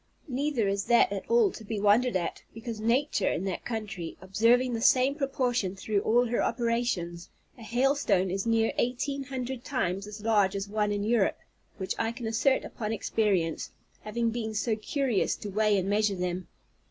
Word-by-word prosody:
Neither 265 Hz, -4 st, 0 dB
is 200 Hz, 0 st, -1 dB
that 235 Hz, -3 st, +4 dB
at 200 Hz, -1 st, -5 dB
all 465 Hz, -4 st, +4 dB
to 225 Hz, -, -10 dB
be 215 Hz, 0 st, -4 dB
wondered 210 Hz, +3 st, +3 dB
at, 175 Hz, -2 st, -2 dB
because 225 Hz, -1 st, -6 dB
nature, 245 Hz, +7 st, +1 dB
in -, -, -2 dB
that 190 Hz, -2 st, -3 dB
country, 215 Hz, -7 st, -5 dB
observing 230 Hz, +6 st, +2 dB
the 225 Hz, -, -2 dB
same 260 Hz, +2 st, +4 dB
proportion 250 Hz, -8 st, -1 dB
through 200 Hz, +2 st, -1 dB
all 240 Hz, +4 st, +3 dB
her 240 Hz, 0 st, 0 dB
operations, 230 Hz, -8 st, -1 dB, 0.3 s
a 245 Hz, -, -15 dB
hailstone 235 Hz, -6 st, +1 dB
is 195 Hz, +4 st, -2 dB
near 225 Hz, -1 st, +2 dB
eighteen 270 Hz, +3 st, -1 dB
hundred 255 Hz, -1 st, -5 dB
times 195 Hz, -7 st, -2 dB
as 210 Hz, 0 st, -8 dB
large 205 Hz, -4 st, +3 dB
as 200 Hz, 0 st, -3 dB
one 210 Hz, 0 st, 0 dB
in 205 Hz, 0 st, -1 dB
Europe; 220 Hz, -2 st, +2 dB, 0.4 s
which 190 Hz, -2 st, -2 dB
I 225 Hz, 0 st, 0 dB
can 240 Hz, -1 st, -7 dB
assert 225 Hz, +5 st, +2 dB
upon 215 Hz, -2 st, -4 dB
experience, 195 Hz, -6 st, 0 dB, 0.3 s
having 230 Hz, +2 st, -1 dB
been 220 Hz, -2 st, -4 dB
so 220 Hz, +1 st, 0 dB
curious 240 Hz, 0 st, 0 dB
to 205 Hz, -, -7 dB
weigh 210 Hz, 0 st, +2 dB
and 190 Hz, 0 st, -1 dB
measure 205 Hz, 0 st, +2 dB
them. 180 Hz, 0 st, -3 dB
220 Hz, 175 wpm, -28 LUFS, 200-245 Hz, 0.4 s, that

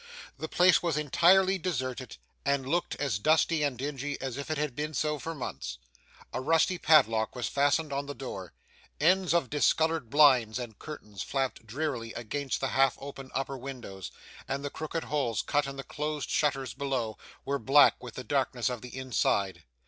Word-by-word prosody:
The 160 Hz, -, -3 dB
place 180 Hz, -1 st, +5 dB
was 170 Hz, -4 st, 0 dB
entirely 185 Hz, +6 st, +4 dB
deserted, 130 Hz, -7 st, -3 dB, 0.3 s
and 140 Hz, -2 st, 0 dB
looked 175 Hz, +5 st, 0 dB
as 135 Hz, -9 st, -1 dB
dusty 155 Hz, +5 st, +3 dB
and 140 Hz, -4 st, 0 dB
dingy 140 Hz, +1 st, -4 dB
as 130 Hz, -3 st, -4 dB
if 140 Hz, +1 st, -6 dB
it 155 Hz, -, -1 dB
had 150 Hz, -4 st, -2 dB
been 150 Hz, +2 st, -3 dB
so 150 Hz, +3 st, 0 dB
for 165 Hz, +4 st, -5 dB
months. 135 Hz, -, -5 dB, 0.6 s
A -, -, -2 dB
rusty 165 Hz, +5 st, +2 dB
padlock 115 Hz, -9 st, +4 dB
was 125 Hz, -, -2 dB
fastened 145 Hz, +2 st, +1 dB
on 140 Hz, +1 st, -2 dB
the 145 Hz, -, -5 dB
door, 95 Hz, -8 st, -7 dB, 0.5 s
ends 185 Hz, +3 st, +3 dB
of 170 Hz, -7 st, +1 dB
discoloured 160 Hz, -2 st, +2 dB
blinds 130 Hz, -6 st, +5 dB
and 120 Hz, -4 st, -7 dB
curtains 105 Hz, -, -8 dB
flapped 135 Hz, -4 st, -2 dB
drearily 120 Hz, -2 st, -3 dB
against 135 Hz, +4 st, -3 dB
the 135 Hz, -, 0 dB
half 135 Hz, 0 st, +3 dB
opened 135 Hz, -1 st, -8 dB
upper 135 Hz, 0 st, -2 dB
windows, 120 Hz, -8 st, -7 dB, 0.4 s
and 140 Hz, +1 st, -3 dB
the 145 Hz, -, -3 dB
crooked 160 Hz, +1 st, -4 dB
holes 135 Hz, -7 st, -1 dB
cut 145 Hz, -1 st, +1 dB
in 135 Hz, -, -6 dB
the 135 Hz, -, -6 dB
closed 150 Hz, 0 st, -4 dB
shutters 135 Hz, -6 st, 0 dB
below, 130 Hz, -5 st, -2 dB, 0.3 s
were 140 Hz, 0 st, -1 dB
black 140 Hz, +2 st, +5 dB
with 120 Hz, -3 st, -8 dB
the 130 Hz, -, -5 dB
darkness 130 Hz, -3 st, 0 dB
of 125 Hz, -3 st, -4 dB
the 125 Hz, +1 st, -9 dB
inside. 100 Hz, -, 0 dB
140 Hz, 180 wpm, -29 LUFS, 125-150 Hz, 0.6 s, place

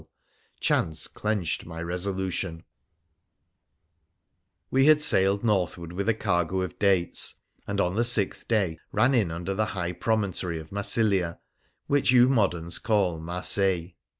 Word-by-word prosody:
8 -, -, -1 dB, 0.6 s
WONDERFUL 105 Hz, -, 0 dB, 0.4 s
ADVENTURES 85 Hz, +3 st, -4 dB, 0.4 s
OF 80 Hz, -3 st, -8 dB, 2.1 s
We 135 Hz, +2 st, +4 dB
had 155 Hz, -1 st, +6 dB
sailed 100 Hz, -8 st, +3 dB
northward 90 Hz, -5 st, -1 dB
with 100 Hz, +4 st, -2 dB
a 115 Hz, -, +2 dB
cargo 90 Hz, -2 st, 0 dB
of 95 Hz, -, -5 dB
dates, 95 Hz, -4 st, +2 dB, 0.3 s
and 100 Hz, 0 st, -2 dB
on 90 Hz, -2 st, +1 dB
the 115 Hz, +4 st, +1 dB
sixth 115 Hz, -5 st, +1 dB
day 95 Hz, -8 st, 0 dB
ran 120 Hz, +6 st, +3 dB
in 110 Hz, -9 st, +2 dB
under 85 Hz, +4 st, -4 dB
the 110 Hz, +2 st, 0 dB
high 85 Hz, -1 st, -2 dB
promontory 95 Hz, -4 st, -1 dB
of 80 Hz, 0 st, -12 dB
Massilia, 100 Hz, -3 st, +1 dB, 0.5 s
which 145 Hz, -1 st, +1 dB
you 125 Hz, 0 st, +6 dB
moderns 90 Hz, -9 st, 0 dB
call 100 Hz, -7 st, 0 dB
Marseilles. 90 Hz, +1 st, 0 dB
95 Hz, 130 wpm, -26 LUFS, 85-110 Hz, 2.1 s, had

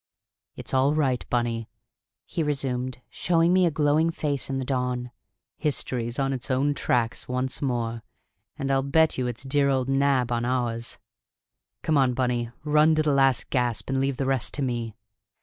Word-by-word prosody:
"It's -, -, -7 dB
all 135 Hz, +3 st, +3 dB
right, 135 Hz, -5 st, +1 dB
Bunny," 115 Hz, -2 st, -1 dB, 0.6 s
he -, -, -3 dB
resumed, 130 Hz, -4 st, -2 dB
showing 170 Hz, 0 st, +2 dB
me 185 Hz, -1 st, +4 dB
a -, -, +3 dB
glowing 150 Hz, +1 st, +2 dB
face 145 Hz, -5 st, -2 dB
in 135 Hz, -, -1 dB
the 130 Hz, -, -2 dB
dawn. 125 Hz, -2 st, -2 dB, 0.5 s
"History's 125 Hz, -5 st, -2 dB
on 135 Hz, -1 st, 0 dB
its 130 Hz, -2 st, -5 dB
own 135 Hz, +3 st, +2 dB
tracks 120 Hz, -4 st, -1 dB
once 125 Hz, +1 st, -2 dB
more, 120 Hz, -4 st, -1 dB, 0.6 s
and 135 Hz, 0 st, -2 dB
I'll 135 Hz, 0 st, +3 dB
bet 155 Hz, +2 st, +2 dB
you 125 Hz, -, 0 dB
it's 120 Hz, 0 st, -5 dB
dear 140 Hz, +1 st, +2 dB
old 130 Hz, -2 st, +1 dB
Nab 135 Hz, -3 st, +2 dB
on 120 Hz, 0 st, 0 dB
ours! 120 Hz, -2 st, -2 dB, 0.9 s
Come 155 Hz, -2 st, +2 dB
on, 130 Hz, -2 st, +2 dB
Bunny; 120 Hz, -2 st, 0 dB
run 150 Hz, +1 st, +4 dB
to 155 Hz, -, +2 dB
the 150 Hz, -2 st, +2 dB
last 135 Hz, -2 st, +2 dB
gasp, 125 Hz, -1 st, 0 dB
and 135 Hz, 0 st, +1 dB
leave 135 Hz, -1 st, 0 dB
the 135 Hz, -, -1 dB
rest 130 Hz, -3 st, 0 dB
to 145 Hz, -, -2 dB
me." 120 Hz, -4 st, -3 dB
130 Hz, 175 wpm, -26 LUFS, 125-145 Hz, 0.9 s, me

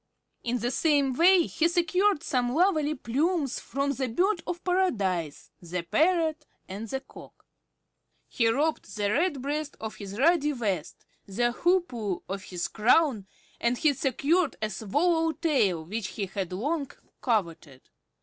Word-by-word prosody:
In 245 Hz, +1 st, -1 dB
the 240 Hz, +1 st, -2 dB
same 285 Hz, -3 st, +2 dB
way 345 Hz, +5 st, +5 dB
he 330 Hz, +1 st, +1 dB
secured 350 Hz, +1 st, +1 dB
some 250 Hz, -3 st, 0 dB
lovely 310 Hz, -4 st, +2 dB
plumes 285 Hz, +3 st, -1 dB
from 280 Hz, +1 st, -2 dB
the 265 Hz, -1 st, -2 dB
Bird 360 Hz, -, +1 dB
of 345 Hz, -1 st, -4 dB
Paradise, 200 Hz, -, -1 dB
the 175 Hz, 0 st, -4 dB
Parrot, 320 Hz, -, +1 dB, 0.2 s
and 205 Hz, +4 st, -6 dB
the 265 Hz, +5 st, -3 dB
Cock. -, -, -15 dB, 0.8 s
He 230 Hz, -, +1 dB
robbed 295 Hz, +5 st, 0 dB
the 205 Hz, -1 st, 0 dB
Redbreast 290 Hz, 0 st, -1 dB
of 220 Hz, -1 st, -6 dB
his 200 Hz, -1 st, -8 dB
ruddy 300 Hz, +1 st, +3 dB
vest, 200 Hz, -, -3 dB, 0.2 s
the 240 Hz, +5 st, 0 dB
Hoopoe 245 Hz, -, 0 dB
of 195 Hz, +1 st, -4 dB
his 175 Hz, -2 st, -3 dB
crown, 225 Hz, -1 st, +2 dB, 0.3 s
and 235 Hz, +1 st, +1 dB
he 305 Hz, +1 st, +3 dB
secured 280 Hz, +5 st, +1 dB
a 215 Hz, 0 st, -2 dB
swallow 320 Hz, -, +1 dB
tail 210 Hz, -, +1 dB
which 210 Hz, +3 st, -4 dB
he 205 Hz, -, -4 dB
had 190 Hz, -1 st, -4 dB
long 280 Hz, -, -2 dB, 0.3 s
coveted. 170 Hz, -, -2 dB
265 Hz, 140 wpm, -27 LUFS, 210-325 Hz, 0.8 s, way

